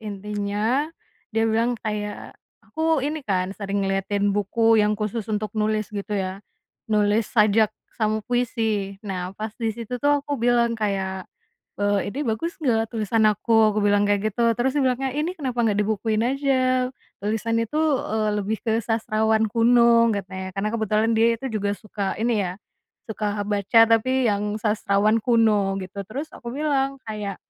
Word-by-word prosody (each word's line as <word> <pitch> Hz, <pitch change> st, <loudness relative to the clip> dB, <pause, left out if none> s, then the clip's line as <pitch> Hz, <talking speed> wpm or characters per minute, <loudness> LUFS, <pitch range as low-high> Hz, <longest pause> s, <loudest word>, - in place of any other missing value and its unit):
intinya, 210 Hz, +6 st, -2 dB, 0.4 s
dia 225 Hz, -1 st, 0 dB
bilang 230 Hz, +2 st, +1 dB
kayak, 210 Hz, -1 st, -4 dB, 0.3 s
aku 320 Hz, -3 st, 0 dB
ini 305 Hz, +2 st, -2 dB
kan 190 Hz, -6 st, -1 dB
sering 200 Hz, -1 st, -2 dB
ngeliatin 200 Hz, +1 st, 0 dB
buku 220 Hz, +2 st, +3 dB
yang 210 Hz, 0 st, +2 dB
khusus 215 Hz, +1 st, -3 dB
untuk 215 Hz, +1 st, -2 dB
nulis 215 Hz, -1 st, -1 dB
gitu 205 Hz, 0 st, -3 dB
ya, 190 Hz, 0 st, -3 dB, 0.5 s
nulis 210 Hz, 0 st, +2 dB
sajak 215 Hz, -1 st, +4 dB, 0.3 s
sama 215 Hz, -1 st, 0 dB
puisi 225 Hz, -5 st, -1 dB
nah 185 Hz, -3 st, -3 dB
pas 215 Hz, 0 st, -4 dB
disitu 230 Hz, +2 st, -3 dB
tuh 290 Hz, +1 st, +2 dB
aku 285 Hz, -1 st, -3 dB
bilang 235 Hz, 0 st, +2 dB
kayak, 190 Hz, -3 st, -2 dB, 0.6 s
eee, 205 Hz, -1 st, +1 dB
"Ini 285 Hz, -, -3 dB
bagus 330 Hz, +11 st, -3 dB
gak 225 Hz, -4 st, +1 dB
tulisan 220 Hz, 0 st, +2 dB
aku?" 215 Hz, 0 st, +3 dB
Aku -, -, 0 dB
bilang 205 Hz, 0 st, +3 dB
kayak 205 Hz, +1 st, +1 dB
gitu, 235 Hz, +4 st, 0 dB
terus 260 Hz, +2 st, +1 dB
dia 290 Hz, -, +3 dB
bilang, 255 Hz, 0 st, +1 dB
"Ya 265 Hz, -, 0 dB
ini 310 Hz, +5 st, -2 dB
kenapa 255 Hz, -5 st, -2 dB
gak 210 Hz, -2 st, +1 dB
dibukuin 215 Hz, +1 st, 0 dB
aja?" 255 Hz, -1 st, +1 dB, 0.3 s
"tulisan 225 Hz, +2 st, -1 dB
itu," 230 Hz, +6 st, -2 dB, 0.3 s
eee, 215 Hz, 0 st, 0 dB
"lebih 210 Hz, +2 st, -1 dB
ke 225 Hz, -1 st, +1 dB
sastrawan 220 Hz, -1 st, +1 dB
kuno," 235 Hz, 0 st, +5 dB
katanya 190 Hz, -1 st, -5 dB
karena 200 Hz, +2 st, -1 dB
kebetulan 220 Hz, 0 st, +1 dB
dia 230 Hz, -, +5 dB
itu 265 Hz, -, -6 dB
juga 205 Hz, -1 st, -1 dB
suka 205 Hz, -2 st, -4 dB
ini 230 Hz, -3 st, +1 dB
ya, 180 Hz, -, -5 dB, 0.6 s
suka 210 Hz, -1 st, -2 dB
baca 205 Hz, +2 st, +3 dB
tapi 240 Hz, +1 st, +2 dB
yang 205 Hz, +1 st, -1 dB
sastrawan 210 Hz, 0 st, +2 dB
kuno 215 Hz, -4 st, +2 dB
gitu 190 Hz, +2 st, -7 dB
terus 280 Hz, +7 st, -5 dB
aku 235 Hz, -, -8 dB
bilang 275 Hz, -2 st, 0 dB
kayak, 210 Hz, -3 st, -4 dB
220 Hz, 160 wpm, -23 LUFS, 205-235 Hz, 0.6 s, kuno